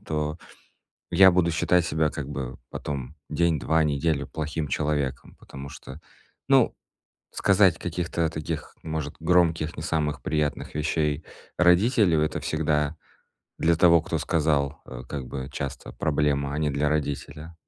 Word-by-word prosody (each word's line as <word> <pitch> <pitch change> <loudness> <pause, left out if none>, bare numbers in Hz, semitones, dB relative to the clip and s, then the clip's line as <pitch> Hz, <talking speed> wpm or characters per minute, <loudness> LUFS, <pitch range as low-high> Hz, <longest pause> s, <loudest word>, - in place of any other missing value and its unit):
то 75 0 -2 0.7
я 95 +2 +7
буду 85 -1 +3
считать 85 +1 +2
себя 80 -2 +1
как 70 -2 -5
бы 65 -3 -5
потом 70 -1 -5
день, 80 0 +1
2, 80 +4 +2
неделю 75 0 0
плохим 75 -1 -4
человеком. 75 -3 -2
Потому 70 +1 -10
что, 65 +1 -10 0.5
ну, - - +4 0.6
сказать 95 -3 +4
каких-то 85 -1 -2
таких, 80 0 -5
может, 80 -2 -4
громких, 85 -2 +2
не 75 - -5
самых 75 -4 -1
приятных 75 -2 -2
вещей 75 0 0 0.3
родителю- 90 - +4
это 75 - 0
всегда 75 -1 0 0.6
для 85 +1 +3
того, 85 -1 +6
кто - - -2
сказал, 75 -3 0
э, 65 -1 -8
как 70 -4 -5
бы, 65 0 -5
часто 70 -2 -5
проблема, 70 -2 0
а - - -2
не 75 -1 +1
для 75 +2 0
родителя. 75 +2 -3
75 Hz, 140 wpm, -26 LUFS, 70-80 Hz, 0.7 s, я